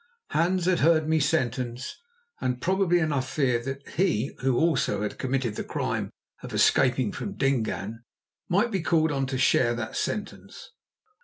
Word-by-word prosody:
Hans 175 +2 +1
had 185 -1 +2
heard 155 0 +3
me 160 0 +3
sentenced, 130 -4 -1 0.4
and 125 -1 -1
probably 185 +2 +2
enough 145 -6 0
feared 125 -5 0
that 135 +1 -5
he 155 - 0
who 130 -1 +1
also 160 -10 +1
had 105 - -4
committed 130 -4 -1
the - - -2
crime - - -2 0.3
of - - -7
escaping 125 -3 +3
from 200 - -5
Dingaan, 115 -5 -1 0.5
might 205 +6 +2
be 195 -4 0
called 160 -2 +2
on 135 -2 -1
to 130 0 -2
share 120 -1 +3
that 110 -2 -5
sentence. 210 - -5
135 Hz, 155 wpm, -26 LUFS, 125-165 Hz, 0.5 s, heard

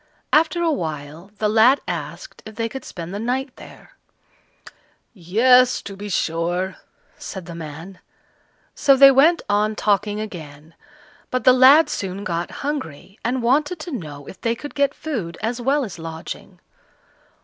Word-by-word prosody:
After 325 +3 +3
a 330 - +2
while, 155 - -5
the 215 - 0
lad 225 +6 +5
asked - - -6
if 220 - -11
they 230 0 -1
could 265 +3 -8
spend 170 0 -8
the 200 - -4
night 255 +3 -2
there. - - -14 1.2
"Yes, 240 +7 +4
to 200 - -8
be 205 +1 -7
sure," 175 +2 -1 0.4
said 190 -4 -7
the 170 - -8
man. 165 +3 -9 0.7
So 275 -1 +4
they 275 0 +9
went 310 +6 +4
on 210 +1 +1
talking 210 0 0
again, 160 -7 -9 0.6
but 255 - -2
the 255 - +7
lad 265 +5 +7
soon 195 0 -4
got 170 -3 -3 0.2
hungry, 205 - -5
and 245 +1 -1
wanted 295 +8 +2
to 345 - -7
know 150 - -7
if - - -11
they 230 0 0
could 290 +5 -9
get 280 -1 +1
food 220 - -5
as 235 +3 -3
well 275 +4 +1
as 190 -6 -9
lodging. 160 0 -8
215 Hz, 155 wpm, -21 LUFS, 175-265 Hz, 1.2 s, they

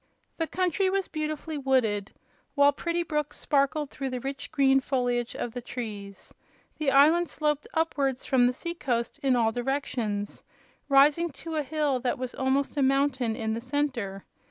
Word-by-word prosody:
The 325 - -1
country 370 +2 +1
was 390 0 0
beautifully 310 0 -4
wooded, 225 -7 +1 0.4
while 285 0 +6
pretty 340 +4 -2
brooks 300 -3 -2
sparkled 285 +1 +1
through 270 -1 -4
the 255 -1 -3
rich 275 +2 -6
green 270 -3 +4
foliage 245 -3 -1
of 235 - -4
the 245 - -5
trees. 210 -5 -7 0.5
The 305 -3 +1
island 310 +5 +5
sloped 300 -1 -1
upwards 280 -5 0
from 250 -3 +4
the 250 - +1
sea 340 +6 -5
coast 240 -8 -2
in 265 -2 +2
all 225 -2 +3
directions, 240 -5 -2 0.5
rising 290 +5 +5 0.2
to 325 -1 -4
a 305 - +1
hill 290 -2 0
that 245 0 -1
was 255 -1 -5
almost 270 +2 0
a - - +2
mountain 265 -4 +2
in 220 -2 -2
the 230 - -3
center. 250 -7 -2
275 Hz, 165 wpm, -27 LUFS, 245-300 Hz, 0.5 s, while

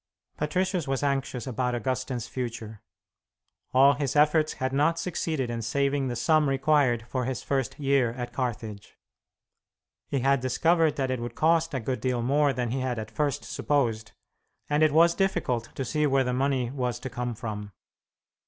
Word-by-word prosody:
Patricius 180 +1 -1
was 135 +1 -1
anxious 135 -3 -1
about 125 -1 -1
Augustine's 125 0 -2
future. 115 -4 -6 0.9
All 135 +2 +6
his 140 -1 -2
efforts 155 +1 +3
had 130 0 -3
not 150 +4 +2
succeeded 155 -7 -2
in 115 -1 -3
saving 140 +4 0
the 120 - -3
sum 150 +5 +3
required 135 -4 +2
for 130 -1 -2
his 130 -1 -3
first 135 -3 -1
year 135 -4 +2
at 125 0 -6
Carthage. 110 -5 -5 1.1
He 140 - -1
had 135 +1 +3
discovered 160 +5 +2
that 135 -2 -1
it 130 - -1
would 120 +1 -6
cost 165 -1 +2
a - - 0
good 125 +2 -3
deal 125 -2 0
more 145 +3 +3
than 125 -2 -2
he 135 - -1
had 130 -2 -2
at 110 0 -6
first 145 +3 -1
supposed, 115 -7 -1 0.5
and 150 +1 +1
it 155 -1 +5
was 165 +3 +5
difficult 165 - -1
to 135 - -3
see 150 +4 +1
where 135 -1 +3
the 125 -1 -1
money 130 -2 0
was 125 -4 -2
to 130 - -5
come 120 -1 -3
from. 105 -3 -6
130 Hz, 170 wpm, -27 LUFS, 120-145 Hz, 1.1 s, All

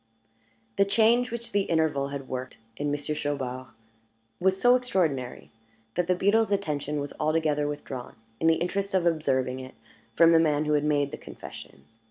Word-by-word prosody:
The 200 - +5
change 230 +4 +3
which 235 -1 -6
the 200 - +2
interval 160 -4 +1
had 140 -1 -6
worked 130 0 -5 0.2
in 145 +4 -2
Monsieur 145 +1 -2
Chaubard 130 -4 -3 0.7
was 190 +1 +2
so 245 +3 +6
extraordinary, 170 - -1 0.4
that 175 +5 0
the 180 - +3
beadle's 205 +4 +2
attention 150 -7 -1
was 145 0 -5
altogether 155 -1 +1
withdrawn, 135 -4 -6 0.2
in 165 - +2
the 165 - +5
interest 195 +3 -2
of 180 -2 +2
observing 130 -6 +1
it, 130 0 -10 0.4
from 165 0 +6
the 165 - +6
man 155 -2 +2
who 150 - +1
had 150 -1 +2
made 145 -2 +1
the - - -6
confession. 70 0 -11
155 Hz, 170 wpm, -27 LUFS, 140-190 Hz, 0.7 s, so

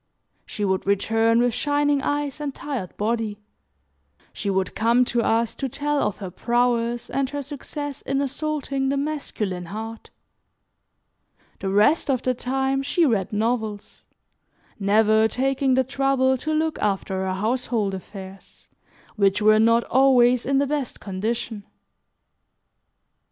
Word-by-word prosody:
She 205 - -3
would 190 0 -1
return 225 +3 +2
with 245 -1 +2
shining 290 0 +1
eyes 290 0 -2
and 285 -2 -4
tired 260 -11 -5
body; 220 -1 -1 1.0
she 205 - -3
would 190 -1 0
come 235 +3 +3
to 240 -1 0
us 230 0 +1
to 270 - -4
tell 295 +3 -1
of 210 - -1
her 190 -3 -7
prowess, 240 +2 0
and 270 0 -1
her 285 0 -4
success 290 +1 -6
in 275 0 -1
assaulting 280 -1 -2
the 280 - 0
masculine 225 -11 -3
heart. 220 +3 -7 1.5
The 195 - -3
rest 210 +12 +3
of 255 -2 +1
the 255 - +1
time 265 +2 -1
she 325 +5 +2
read 215 -9 0
novels, 220 -1 -2 0.8
never 215 +2 +4
taking 265 +2 +1
the 260 - +3
trouble 265 0 +1
to 305 +5 -3
look 315 0 0
after 195 -2 -1
her 185 - -1
household 220 -1 -1
affairs, 190 +1 -10 0.5
which 195 -1 +3
were 215 0 +5
not 230 +1 +4
always 250 -2 +4
in 275 0 +2
the 280 - +3
best 280 -3 -3
condition. 215 +2 -3
240 Hz, 135 wpm, -23 LUFS, 210-275 Hz, 1.5 s, were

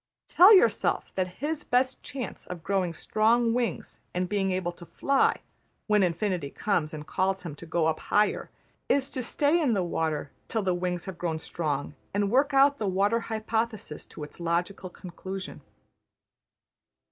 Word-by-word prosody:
Tell 370 +4 +8
yourself 235 - +4
that 185 -1 0 0.2
his 300 0 -1
best 255 +1 +1
chance 255 -6 -7
of 175 -3 -7
growing 190 -2 0
strong 230 +6 +2
wings 240 -1 -2 0.2
and 180 0 0
being 195 0 0
able 185 -1 -1
to 175 0 -13
fly, 275 -1 +2 0.4
when 210 -1 +3
Infinity 180 -3 0
comes 165 -3 -1
and 150 -1 -7
calls 190 +2 0
him 170 -4 -5
to 170 - -10
go 160 0 +1
up 160 -1 +1
higher, 210 0 +1 0.4
is 275 -1 +2
to 260 - -2
stay 290 +7 +2
in 270 -7 +2
the 195 -3 +1
water 160 -4 -2 0.2
till 220 -2 -1
the 185 -1 +1
wings 175 -1 -2
have 190 -2 -7
grown 165 -2 -1
strong 150 -3 -3 0.2
and 205 0 +1
work 275 +4 +3
out 275 +1 +5
the 210 - -1
water 200 +5 +2
hypothesis 220 -5 -2
to 150 - -9
its 150 - -10
logical 175 +3 -2
conclusion. 190 +2 -7
195 Hz, 165 wpm, -27 LUFS, 175-230 Hz, 0.4 s, Tell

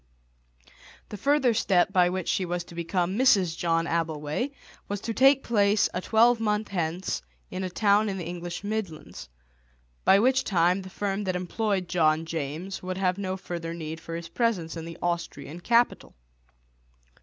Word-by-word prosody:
The 210 - -6
further 275 +1 +3
step 195 -3 +2
by 180 -2 +4
which 185 -1 -3
she 190 - +1
was 175 -1 -2
to 170 - -14
become 175 +4 -1
Mrs. 195 -10 +4
John 165 -1 +1
Abbleway 160 - -1 0.4
was 205 0 -3
to 225 - -3
take 270 +3 +5
place 205 -2 +3
a 180 - -2
twelvemonth 220 -1 +2
hence 175 -1 -2 0.3
in 185 +1 -4
a 185 - -2
town 205 +3 +3
in 195 - -3
the 175 - -5
English 175 +1 -6
midlands, 185 - -5 0.7
by 195 - +6
which 260 +5 +3
time 180 0 +2
the 190 - -9
firm 200 +1 -2
that 185 -1 -1
employed 190 +1 -1
John 160 -2 +2
James 160 +4 -4
would 185 0 -4
have 185 0 0
no 190 -1 -2
further 170 -3 -5
need 160 -1 -6
for 165 0 -7
his 170 0 -6
presence 185 -6 -1
in 165 -1 -6
the 165 0 -8
Austrian 170 -3 -3
capital. 235 +6 +1
185 Hz, 165 wpm, -27 LUFS, 170-205 Hz, 0.7 s, by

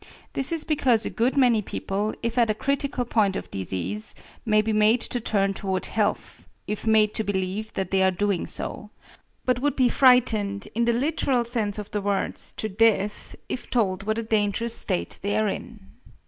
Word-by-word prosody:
This 270 +2 0
is 330 -2 0
because 260 -8 +2
a - - -3
good 245 +5 0
many 245 -5 +4
people, 205 +1 -3
if 230 0 -1
at 230 -2 +3
a 215 - +1
critical 275 0 -1
point 210 -5 +2
of - - -6
disease, 95 +2 -4 0.3
may 215 -1 +4
be 220 0 -1
made 215 +3 +4
to 245 - -2
turn 200 -3 +1
toward 190 -2 -2
health 215 -2 -2 0.2
if 210 +1 -4
made 215 -1 +4
to 220 - 0
believe 200 +2 -2
that 190 -2 -3
they 190 0 +3
are 190 - +5
doing 195 -1 -1
so, 210 - -5 0.6
but 250 -1 +2
would 290 +2 0
be 255 -2 +3
frightened, 215 -6 +3
in 235 +2 +1
the 235 - +3
literal 260 -1 +1
sense 220 -4 -2
of 210 -1 -7
the 205 - -1
words, 200 0 -2
to 220 - -4
death, 210 0 +1
if 255 - -5
told 200 -6 +1
what 215 +2 -1
a 230 - -1
dangerous 220 +1 0
state 85 0 -2
they 200 +1 0
are 215 0 +2
in. 215 +2 -5
215 Hz, 190 wpm, -25 LUFS, 200-235 Hz, 0.6 s, are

